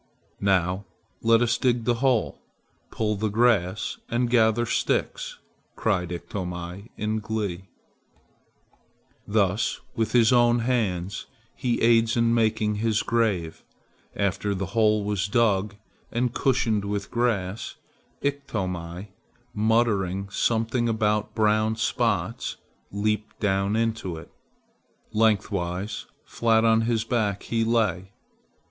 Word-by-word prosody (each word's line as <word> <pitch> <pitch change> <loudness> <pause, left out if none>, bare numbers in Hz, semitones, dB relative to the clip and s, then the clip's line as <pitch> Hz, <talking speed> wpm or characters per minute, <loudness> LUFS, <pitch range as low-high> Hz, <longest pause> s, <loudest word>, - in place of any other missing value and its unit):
"Now 95 0 +1 0.4
let 115 +1 +4
us 115 -1 +1
dig 120 -2 +1
the 120 - +3
hole, 130 -5 +1 0.5
pull 105 -1 -1
the 110 +2 -1
grass, 105 -3 +1
and 120 0 0
gather 115 0 +3
sticks," - - -1 0.4
cried 90 -5 0
Iktomi 90 +3 -6
in 110 +1 -1
glee. 105 -4 -3 1.6
Thus 105 +1 +1 0.2
with 115 -1 -1
his 120 -1 +5
own 120 -1 +5
hands 100 -7 -1 0.3
he 120 -2 -1
aids 115 0 +4
in 115 0 +3
making 110 -2 +1
his 110 0 +1
grave. 105 -9 0 0.5
After 100 0 0
the 95 +1 -2
hole 110 -2 +3
was 100 -1 -1
dug 105 -2 +1 0.4
and 120 0 0
cushioned 115 -6 +1
with 100 0 -3
grass, 115 -4 -1 0.5
Iktomi, 95 -10 -3 0.4
muttering 105 -4 +1
something 115 +2 +1
about 105 -2 0
brown 110 0 +2
spots, 110 - -1 0.3
leaped 105 +1 -2
down 100 0 +1
into 110 -6 -1
it. - - -11 0.8
Lengthwise, 100 -3 0 0.2
flat 115 -1 +2
on 115 0 +4
his 115 -2 +1
back, 110 -4 -1
he 115 -1 0
lay. 105 -5 0
110 Hz, 110 wpm, -25 LUFS, 100-115 Hz, 1.6 s, his